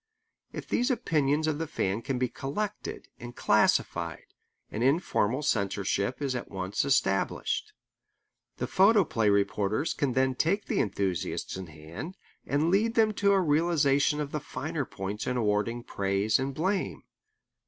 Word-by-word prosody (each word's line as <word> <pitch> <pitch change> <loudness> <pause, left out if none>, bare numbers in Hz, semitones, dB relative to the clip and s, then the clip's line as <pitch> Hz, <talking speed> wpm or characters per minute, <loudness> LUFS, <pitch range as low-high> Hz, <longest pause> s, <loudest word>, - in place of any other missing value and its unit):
If - - -7
these 245 +3 +1
opinions 155 - +1
of 155 -1 -1
the 165 - -2
fan 100 -4 -1
can 130 +2 -2
be 125 0 +1
collected 195 - -4
and 120 0 -9
classified, 85 -1 +1 0.5
an 110 - -4
informal 135 - +1
censorship 100 +2 0
is 135 -2 -1
at 125 - -5
once 95 0 -2
established. 130 -8 0 0.8
The - - -2
photoplay 190 - +4
reporters 100 +6 +1
can 135 -3 -1
then 130 +1 +2
take 190 +10 0
the - - -1
enthusiasts 95 -4 -1
in 95 -1 -6
hand 85 - -9 0.3
and 150 +4 +1
lead 225 +4 +2
them 220 -1 +4
to 200 0 +5
a 195 - +4
realization 150 -3 +2
of 145 -1 -3
the 150 - -2
finer 145 +2 -4
points 100 +1 -5
in 125 - 0
awarding 115 +2 0
praise 100 +2 0
and 135 +1 -1
blame. 185 +8 -1
130 Hz, 145 wpm, -28 LUFS, 105-160 Hz, 0.8 s, to